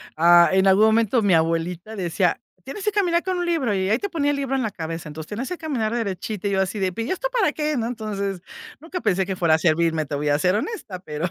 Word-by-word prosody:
ah, 170 Hz, +2 st, +6 dB
en 190 Hz, +1 st, +3 dB
algún 195 Hz, +3 st, +6 dB
momento, 225 Hz, +1 st, +3 dB
mi 200 Hz, -2 st, +3 dB
abuelita 165 Hz, +5 st, 0 dB
decía: 175 Hz, -5 st, 0 dB, 0.2 s
"Tienes 415 Hz, -, -7 dB
que 420 Hz, -, +2 dB
caminar 355 Hz, -4 st, +1 dB
con 370 Hz, -1 st, -2 dB
un 350 Hz, -, -1 dB
libro", 315 Hz, -10 st, 0 dB
y 190 Hz, -1 st, 0 dB
ahí 220 Hz, -, +3 dB
te 405 Hz, -, -3 dB
ponía 295 Hz, -5 st, 0 dB
el 285 Hz, -, -2 dB
libro 270 Hz, -1 st, -2 dB
en 265 Hz, -, 0 dB
la 225 Hz, -, -1 dB
cabeza. 165 Hz, -4 st, -6 dB
Entonces, 155 Hz, +1 st, -8 dB
"tienes 235 Hz, +8 st, -5 dB
que 360 Hz, -, -4 dB
caminar 265 Hz, -10 st, -2 dB
derechita", 205 Hz, -2 st, -3 dB
y -, -, -1 dB
yo 190 Hz, -1 st, +2 dB
así 190 Hz, +3 st, -2 dB
de 190 Hz, -2 st, 0 dB
pero: 225 Hz, +3 st, -4 dB
"¿Y -, -, -3 dB
esto 375 Hz, +7 st, -1 dB
para 430 Hz, -11 st, +2 dB
qué?" 305 Hz, 0 st, -1 dB
¿No? 230 Hz, -3 st, -1 dB
Entonces, 200 Hz, -5 st, -4 dB, 0.4 s
nunca 335 Hz, +4 st, -6 dB
pensé 190 Hz, 0 st, +1 dB
que 190 Hz, 0 st, -3 dB
fuera 170 Hz, -3 st, +3 dB
a -, -, +2 dB
servirme. 160 Hz, -1 st, +1 dB
Te 140 Hz, -, -8 dB
voy 145 Hz, +1 st, -1 dB
a 145 Hz, -, +3 dB
ser 180 Hz, +4 st, +2 dB
honesta, 215 Hz, -, -4 dB
pero 155 Hz, -2 st, -4 dB
205 Hz, 265 wpm, -23 LUFS, 175-270 Hz, 0.4 s, ah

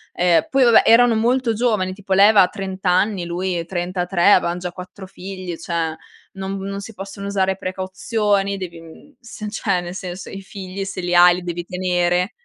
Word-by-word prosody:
Ehm, 175 Hz, -2 st, +3 dB
poi, 270 Hz, -1 st, +3 dB
vabbè, 235 Hz, -2 st, +6 dB
erano 235 Hz, +1 st, +6 dB
molto 235 Hz, +2 st, +1 dB
giovani, 215 Hz, -5 st, 0 dB
tipo 195 Hz, 0 st, -4 dB
lei 200 Hz, +2 st, +7 dB
aveva 205 Hz, -4 st, +6 dB
30 190 Hz, 0 st, -7 dB
anni, 185 Hz, +1 st, +1 dB
lui 175 Hz, 0 st, -2 dB
33, 180 Hz, +1 st, +1 dB
avevan 175 Hz, -2 st, +3 dB
già 180 Hz, 0 st, -5 dB
4 180 Hz, +2 st, -10 dB
figli, 185 Hz, -1 st, -7 dB
cioè, 165 Hz, -1 st, -3 dB, 0.4 s
non 195 Hz, 0 st, -5 dB
non 195 Hz, +1 st, -5 dB
si 225 Hz, +3 st, -9 dB
possono 200 Hz, +1 st, -7 dB
usare 190 Hz, -1 st, 0 dB
precauzioni, 195 Hz, +2 st, -1 dB
devi, 170 Hz, -3 st, -7 dB
mhmm, 165 Hz, -, -16 dB
s 225 Hz, -3 st, -9 dB
cioè 195 Hz, -4 st, -1 dB
nel 175 Hz, 0 st, -7 dB
senso, 185 Hz, 0 st, -7 dB
i 195 Hz, -, -7 dB
figli 195 Hz, 0 st, -7 dB
se 195 Hz, -1 st, -5 dB
li 175 Hz, 0 st, -2 dB
hai, 175 Hz, 0 st, +7 dB
li 180 Hz, -, -6 dB
devi 175 Hz, 0 st, -4 dB
tenere. 180 Hz, +1 st, 0 dB
185 Hz, 185 wpm, -20 LUFS, 180-200 Hz, 0.4 s, lei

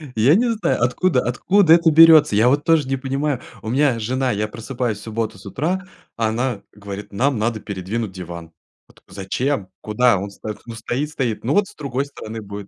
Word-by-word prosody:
Я 120 Hz, +9 st, +5 dB
не 240 Hz, +2 st, +2 dB
знаю 225 Hz, -, -1 dB
откуда! 125 Hz, +4 st, +2 dB
Откуда -, -, -2 dB
откуда 190 Hz, -4 st, +5 dB
это 165 Hz, -1 st, +5 dB
берётся, 160 Hz, -7 st, +7 dB
я 115 Hz, +4 st, +5 dB
вот 145 Hz, +2 st, +1 dB
тоже 160 Hz, -4 st, +3 dB
не 135 Hz, 0 st, -1 dB
понимаю. 135 Hz, 0 st, -2 dB, 0.2 s
У 110 Hz, -, -6 dB
меня 130 Hz, -1 st, +2 dB
жена, 130 Hz, +4 st, -1 dB
я 105 Hz, 0 st, -1 dB
просыпаюсь 115 Hz, 0 st, -4 dB
в -, -, -13 dB
субботу 110 Hz, -2 st, -4 dB
с 95 Hz, -, -16 dB
утра, 165 Hz, -, -2 dB, 0.3 s
а 115 Hz, -1 st, +1 dB
она 120 Hz, -2 st, -2 dB
говорит: 100 Hz, 0 st, -8 dB
нам 125 Hz, +5 st, 0 dB
надо 110 Hz, 0 st, -1 dB
передвинуть 100 Hz, +2 st, -4 dB
диван. 85 Hz, -3 st, -9 dB, 0.4 s
Вот -, -, -23 dB
зачем? 100 Hz, +3 st, -3 dB
Куда? 110 Hz, +1 st, +2 dB
Он 100 Hz, +2 st, -5 dB
сто 105 Hz, +2 st, -7 dB
ну 115 Hz, -, -8 dB
стоит, 125 Hz, +6 st, -3 dB
стоит 125 Hz, -8 st, -3 dB
ну 130 Hz, -, 0 dB
вот 205 Hz, +2 st, +3 dB
с -, -, -15 dB
другой 140 Hz, -2 st, -3 dB
стороны 115 Hz, -5 st, -8 dB
будет. 100 Hz, -1 st, -8 dB
120 Hz, 205 wpm, -20 LUFS, 105-145 Hz, 0.4 s, берётся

